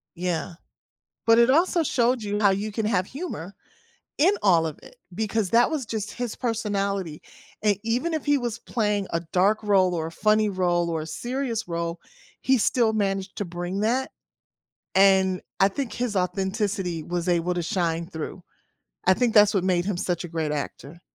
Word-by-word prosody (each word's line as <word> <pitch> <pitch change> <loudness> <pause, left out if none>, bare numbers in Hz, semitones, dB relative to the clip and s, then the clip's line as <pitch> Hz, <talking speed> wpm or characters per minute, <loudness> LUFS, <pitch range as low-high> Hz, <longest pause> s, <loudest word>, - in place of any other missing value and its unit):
Yeah, 175 0 -2 0.7
but 230 0 +6
it 235 +2 +5
also 335 +3 +3
showed 245 -3 +1
you 205 0 -2
how 205 -2 +5
you 205 +2 -2
can 220 0 -2
have 195 -4 +1
humor 245 - -6 0.7
in 365 +7 +5
all 170 -5 +4
of 155 - -7
it - - -14 0.2
because 215 -1 -1
that 240 +4 +4
was 285 -6 -2
just 215 -2 -4
his 245 -3 -4
personality, 200 - -2 0.4
and 205 -2 +2
even 250 +9 0
if 310 - -2
he 290 -1 +3
was 240 -2 -3
playing 210 -4 -1
a 165 - 0
dark 200 +4 +3
role, 190 -3 +3
or 160 -1 -2
a - - -7
funny 215 +3 +2
role, 175 -2 +1
or 160 -2 -2
a - - -6
serious 240 - -3
role, 170 0 -3 0.4
he 265 -1 +3
still 225 0 +2
managed 195 -2 -1
to 205 - -2
bring 175 +3 -4
that, 250 +5 0 0.8
and 190 -1 +4 0.2
I 195 - +6
think 260 +4 -4
his 240 -4 -2
authenticity 190 -1 -1
was 175 +2 -3
able 175 0 +1
to 175 - -1
shine 170 -1 -1
through. 165 +3 -7 0.6
I 185 - +6
think 235 +3 +1
that's 210 0 +6
what 185 - +1
made 180 -2 +1
him 200 -3 -1
such 175 -1 -2
a - - -5
great 160 -2 -2
actor. 145 +2 -6
200 Hz, 180 wpm, -25 LUFS, 175-230 Hz, 0.8 s, but